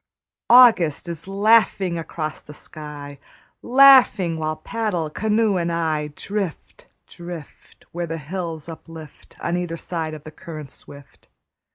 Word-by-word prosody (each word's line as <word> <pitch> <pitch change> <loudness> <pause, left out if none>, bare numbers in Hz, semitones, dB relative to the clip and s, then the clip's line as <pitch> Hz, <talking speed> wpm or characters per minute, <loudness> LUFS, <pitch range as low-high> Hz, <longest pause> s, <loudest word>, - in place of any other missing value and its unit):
August 225 - +6
is 170 0 -6
laughing 195 -2 +3
across 155 -1 -5
the 150 - -13
sky, 145 -2 -10 0.4
Laughing 255 -9 +6
while 155 0 -2
paddle, 175 -2 -3
canoe 215 +1 +1
and 170 -1 -1
I, 160 -3 -1
Drift, 195 -5 -5 0.2
drift, 170 -3 -11
Where 175 0 -4
the 165 0 -4
hills 165 0 -6
uplift 160 -2 -12
On 170 - -1
either 175 -2 -3
side 160 -2 -4
of 150 - -12
the 155 - -10
current 155 -5 -9
swift. 140 -1 -14
170 Hz, 130 wpm, -22 LUFS, 155-195 Hz, 0.4 s, August